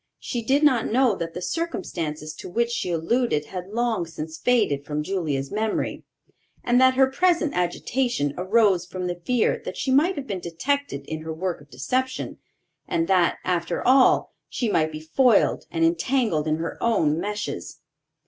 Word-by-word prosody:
She 240 - -4
did 275 +6 +2
not 255 -8 +3
know 250 -1 +4
that 165 -1 -5
the 180 - -5
circumstances 160 - -3
to - - -8
which 235 +5 0
she 235 - -2
alluded 170 0 0
had 180 +1 -6
long 225 -4 -1
since 160 0 -7
faded 210 - +2
from 150 +1 -3
Julia's 150 -7 -2
memory, 215 +1 -2 0.6
and 245 +1 +3
that 260 0 +5
her 265 0 +6
present 330 +2 +1
agitation 180 - -1
arose 190 -1 +3
from 180 0 -6
the 175 -1 -4
fear 250 - +1
that - - -6
she 265 - -1
might 320 +8 +4
have 285 -3 -5
been 195 -7 -4
detected 175 - -2
in 155 +1 -5
her 160 0 -5
work 170 0 -3
of 145 - -18
deception, 255 - -2 0.5
and 165 0 0
that, 180 -3 +3
after 175 -2 -1
all, 260 0 +4 0.2
she 235 -4 -1
might 155 -3 +2
be 155 0 -7
foiled 220 +8 +3
and 165 -1 +1
entangled 170 - +1
in 155 - +2
her 165 +1 -5
own 165 -10 +2
meshes. 210 +3 -4
190 Hz, 170 wpm, -24 LUFS, 165-250 Hz, 0.6 s, her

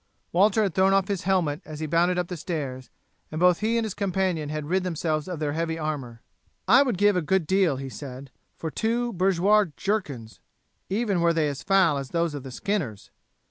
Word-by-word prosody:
Walter 205 +4 +4
had 195 -5 -1
thrown 190 +2 +4
off 195 +1 +1
his 195 -3 -2
helmet 175 -5 +1
as 155 -1 -9
he 160 - -2
bounded 170 +3 +2
up 180 -1 -1
the 180 - -5
stairs, 145 -6 -5 0.4
and 155 - -4
both 180 0 +4
he 225 +2 +1
and 230 - +1
his 215 - -4
companion 185 -6 -1
had 155 -1 -4
rid 185 +3 +1
themselves 160 -3 -2
of 180 -2 -4
their 150 -1 -2
heavy 165 0 -2
armour. 140 -7 -4 0.5
"I 245 +7 +7
would 250 -8 +1
give 205 +1 +4
a 180 - +1
good 185 +2 +1
deal," 190 -4 +2
he 135 +1 -6
said, 135 0 -9 0.3
"for 160 - -4
two 235 +5 -1
bourgeois 195 +3 +3
jerkins, 145 - -3 0.5
even 200 -3 0
were 170 0 +3
they 160 -2 +1
as 140 -1 -5
foul 185 -6 +3
as 135 -1 -6
those 170 -2 0
of 145 - -5
the 135 - -9
skinners. 145 - -3
170 Hz, 210 wpm, -25 LUFS, 150-195 Hz, 0.5 s, I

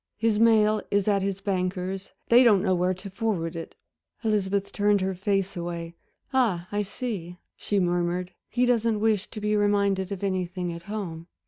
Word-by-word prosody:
His 220 -1 +1
mail 215 -2 +4
is 200 0 +1
at 200 -2 +3
his 195 0 -2
banker's 185 0 -2 0.2
they 240 +2 +8
don't 205 -6 +5
know 190 -3 +2
where 180 +1 +1
to 195 +2 -9
forward 190 -6 -2
it." 165 - -7 0.5
Elizabeth 200 -2 0
turned 205 0 +2
her 190 0 0
face 195 +1 -1
away. 170 -1 -5 0.4
"Ah, 205 -10 +2
I 205 0 0
see," 195 -5 -5 0.2
she 205 - -1
murmured, 175 0 0 0.2
"he 245 +1 +2
doesn't 230 -3 +2
wish 215 -2 +1
to 220 - -8
be 210 0 0
reminded 200 -2 +1
of 200 -1 -5
anything 180 -2 -2
at 170 - -8
home." 170 -6 -5
195 Hz, 175 wpm, -26 LUFS, 180-210 Hz, 0.5 s, they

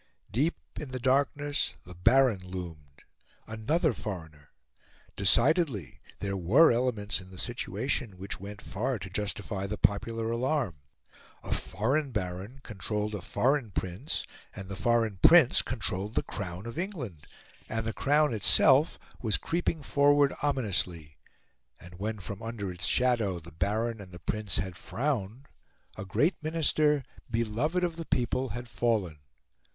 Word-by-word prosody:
Deep 145 - +1 0.2
in 150 - -6
the 130 0 -4
darkness 140 +3 +1
the 90 - -11
Baron 115 +4 +4
loomed. 85 -7 -8 0.4
Another 140 - 0
foreigner! 80 -10 -7 0.7
Decidedly, 120 - +2 0.2
there 100 -1 -3
were 110 - +5
elements 110 -6 0
in 95 - -13
the 95 - -12
situation 120 0 -2
which 95 +2 -5
went 100 +2 -8
far 120 +5 -2
to 95 -2 -8
justify 100 0 -2
the 105 +2 -3
popular 115 +2 +1
alarm. 120 - 0 0.7
A - - -1
foreign 135 +10 0
Baron 95 +5 -4
controlled 105 0 -3
a 105 - -4
foreign 135 +5 +1
Prince, 95 - -3 0.3
and 95 -1 -8
the 95 - -4
foreign 115 -2 +1
Prince - - +7
controlled 100 +4 -1
the - - +2
Crown 95 -1 -5
of 115 +7 -5
England. 140 - -5 0.4
And 110 0 -2
the 110 - -2
Crown 150 -1 +3
itself 120 - +5 0.2
was 110 -3 +1
creeping 165 -2 -1
forward 145 0 +4
ominously; 95 - -1 0.6
and 90 +1 -13
when, 110 +2 -2
from 100 +1 -7
under 110 -4 -4
its 90 0 -2
shadow, 120 -7 +2
the 85 +1 -13
Baron 110 +6 -1
and 95 -2 -11
the 90 - -9
Prince 105 0 -1
had 90 +3 -3
frowned, 125 -2 -2 0.5
a 95 - -6
great 150 - +1
Minister, 155 -2 +2 0.3
beloved 120 +10 0
of 170 -2 -1
the 165 - -5
people, 130 0 0
had 120 +3 -5
fallen. 105 -10 0
110 Hz, 140 wpm, -29 LUFS, 95-135 Hz, 0.7 s, Prince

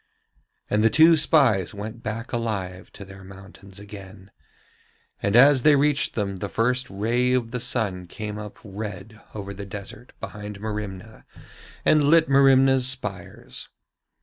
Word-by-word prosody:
And 105 +1 +1
the 115 - +5
two 165 +5 +6
spies 125 - +3
went 110 +3 -7
back 115 +1 -6
alive 100 -6 -4
to 100 - -10
their 95 0 -13
mountains 95 0 -13
again, 100 -1 -12 0.9
and 100 +1 0
as 135 +2 +7
they 150 +3 +5
reached 145 0 +1
them 100 -3 -2
the 100 +2 -5
first 125 +4 0
ray 120 +6 0
of 120 -3 -1
the 125 - -3
sun 110 -7 -2
came 105 +2 -6
up 105 -1 -9
red 105 +1 -8
over 100 -1 -6
the 100 +1 -8
desert 100 +4 -9
behind 105 -1 -8
Merimna 105 0 -7 0.6
and 150 -2 +4
lit 160 +2 +5
Merimna's 135 -1 +4
spires. 105 -9 -4
110 Hz, 145 wpm, -24 LUFS, 100-125 Hz, 0.9 s, as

